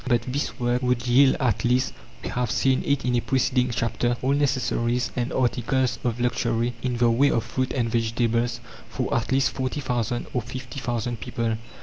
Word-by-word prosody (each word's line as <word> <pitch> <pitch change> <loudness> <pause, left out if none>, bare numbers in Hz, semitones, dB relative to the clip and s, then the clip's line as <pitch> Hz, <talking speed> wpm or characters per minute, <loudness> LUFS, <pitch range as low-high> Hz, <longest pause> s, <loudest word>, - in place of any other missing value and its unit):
But 120 -2 +2
this 135 +4 -3
work 120 0 +1
would 125 -1 0
yield 130 +2 +5
at 125 -7 +1
least 125 +2 +2 0.3
we - - -3
have 125 -2 -1
seen 130 +3 +2
it 140 -2 +1
in 125 -1 +1
a - - +3
preceding 130 -1 +1
chapter 120 +1 0
all 130 - +2
necessaries 125 -4 0
and 120 +1 -1
articles 125 0 0
of 120 -1 -1
luxury 120 0 0
in 125 -2 -1
the 120 -1 +4
way 135 +5 +4
of 115 - +1
fruit 130 +2 -2
and 120 -3 0
vegetables 115 +1 0 0.3
for - - -2
at 115 +1 0
least 135 0 +3
40,000 125 -3 -2
or 125 - 0
50,000 120 -1 -4
people. 115 +2 -2
125 Hz, 180 wpm, -25 LUFS, 120-130 Hz, 0.3 s, yield